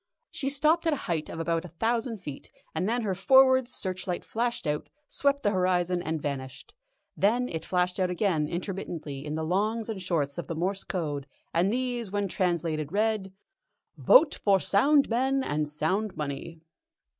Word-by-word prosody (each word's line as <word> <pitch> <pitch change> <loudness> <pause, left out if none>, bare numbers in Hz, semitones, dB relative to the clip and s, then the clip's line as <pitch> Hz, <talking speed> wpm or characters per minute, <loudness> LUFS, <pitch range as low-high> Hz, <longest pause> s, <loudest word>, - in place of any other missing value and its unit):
She 275 - -2
stopped 310 +4 +2
at 320 - +3
a 290 - -4
height 160 -4 -2
of 165 - -6
about 165 0 0
a - - -7
thousand 230 +1 0
feet, 145 -4 -7 0.2
and 185 - -1
then 240 +1 0
her 200 -3 0
forward 260 +5 +5
searchlight 185 -5 -2
flashed 240 0 -2
out, 150 0 -2 0.2
swept 280 0 0
the 205 - +3
horizon, 180 -2 +1
and 160 -2 -2
vanished. 140 - -6 0.4
Then 240 +5 +2
it 160 -6 -5
flashed 180 0 0
out 185 -1 +2
again 180 -5 +1
intermittently 170 -6 -5
in 150 +1 -4
the 160 - -2
longs 215 +6 0
and 205 -4 -4
shorts 160 -5 -1
of - - -6
the 165 - -4
Morse 190 +4 -1
Code, 150 -6 -3 0.3
and 175 +4 +2
these, 245 -3 -2
when 205 0 -1
translated, 165 -5 -1
read: 210 -1 0 0.6
"Vote 415 - +6
for 195 -2 +4
sound 280 +11 +4
men 265 +3 +1
and 150 - -1
sound 185 +8 -1
money!" 150 +3 -5
185 Hz, 170 wpm, -28 LUFS, 165-230 Hz, 0.6 s, Vote